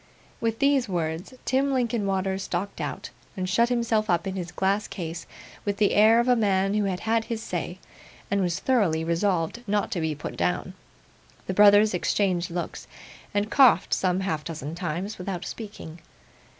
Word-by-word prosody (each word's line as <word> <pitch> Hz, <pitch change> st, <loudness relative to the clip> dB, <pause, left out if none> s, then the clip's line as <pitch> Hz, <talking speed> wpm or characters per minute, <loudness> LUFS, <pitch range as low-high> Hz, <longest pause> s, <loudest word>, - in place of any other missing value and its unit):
With 225 Hz, -1 st, -1 dB
these 275 Hz, -4 st, +2 dB
words, 170 Hz, +5 st, -3 dB
Tim 270 Hz, +2 st, +1 dB
Linkinwater 200 Hz, -7 st, 0 dB
stalked 185 Hz, +1 st, -4 dB
out, -, -, -5 dB, 0.3 s
and 185 Hz, -1 st, -2 dB
shut 230 Hz, +5 st, +3 dB
himself 230 Hz, -3 st, +1 dB
up 175 Hz, 0 st, +2 dB
in 190 Hz, 0 st, -3 dB
his 180 Hz, -2 st, -5 dB
glass 195 Hz, +3 st, 0 dB
case, 165 Hz, -2 st, -6 dB, 0.4 s
with 200 Hz, -1 st, -2 dB
the 210 Hz, -2 st, +3 dB
air 220 Hz, +2 st, +6 dB
of 235 Hz, -, +1 dB
a 250 Hz, -, +5 dB
man 195 Hz, -3 st, +2 dB
who 210 Hz, -1 st, +1 dB
had 185 Hz, -2 st, -2 dB
had 225 Hz, 0 st, +1 dB
his 225 Hz, -1 st, -4 dB
say, 175 Hz, -1 st, -4 dB, 0.5 s
and 200 Hz, 0 st, +2 dB
was 175 Hz, -2 st, 0 dB
thoroughly 195 Hz, -12 st, +1 dB
resolved 170 Hz, +4 st, 0 dB
not 205 Hz, 0 st, 0 dB
to 175 Hz, -, -1 dB
be 160 Hz, -1 st, -1 dB
put 150 Hz, -, -6 dB
down. -, -, -1 dB, 0.7 s
The 190 Hz, -, -2 dB
brothers 205 Hz, +1 st, +6 dB
interchanged 180 Hz, -1 st, 0 dB
looks, 175 Hz, 0 st, -5 dB, 0.4 s
and 205 Hz, +1 st, -1 dB
coughed 255 Hz, -9 st, +5 dB
some 185 Hz, 0 st, +1 dB
half 160 Hz, -6 st, -2 dB
dozen 155 Hz, -2 st, -6 dB
times 175 Hz, +4 st, -4 dB
without 180 Hz, -1 st, -4 dB
speaking. 200 Hz, -8 st, -8 dB
195 Hz, 170 wpm, -26 LUFS, 175-220 Hz, 0.7 s, air